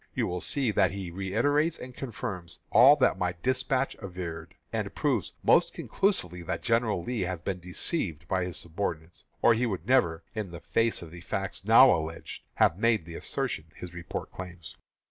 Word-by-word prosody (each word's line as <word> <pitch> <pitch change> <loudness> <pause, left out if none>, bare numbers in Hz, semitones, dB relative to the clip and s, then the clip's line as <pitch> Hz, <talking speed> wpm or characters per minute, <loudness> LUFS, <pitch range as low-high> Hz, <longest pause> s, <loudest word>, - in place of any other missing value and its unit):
You - - +1
will 90 0 -3
see 135 -6 0
that 95 -2 +3
he 95 -2 -5
reiterates 130 - +1
and 125 0 -9
confirms 100 - -6
all - - +8
that - - +2
my 90 -1 0
despatch 130 +1 +1
averred, 90 -4 -6 0.2
and - - -2
proves - - 0
most - - +4
conclusively 90 - -1
that 85 - -4
General 115 -6 +1
Lee 120 +2 -3
has 90 -1 -2
been 90 +2 -3
deceived 90 - -2
by 95 -1 +1
his 90 - -4
subordinates, 85 -1 -5 0.2
or 120 - +7
he 120 +2 +1
would 95 -6 -4
never, 85 -10 +2
in 110 -4 -4
the 85 -1 -8
face 110 +6 0
of 80 - -11
the 85 0 -10
facts 95 +1 -3
now 115 +3 +8
alleged, 80 0 -5
have 85 - +3
made 115 -6 +2
the 85 - -9
assertion 75 - -3
his 90 -1 -8
report 85 -1 -6
claims. 90 -3 -8
95 Hz, 180 wpm, -28 LUFS, 85-115 Hz, 0.2 s, all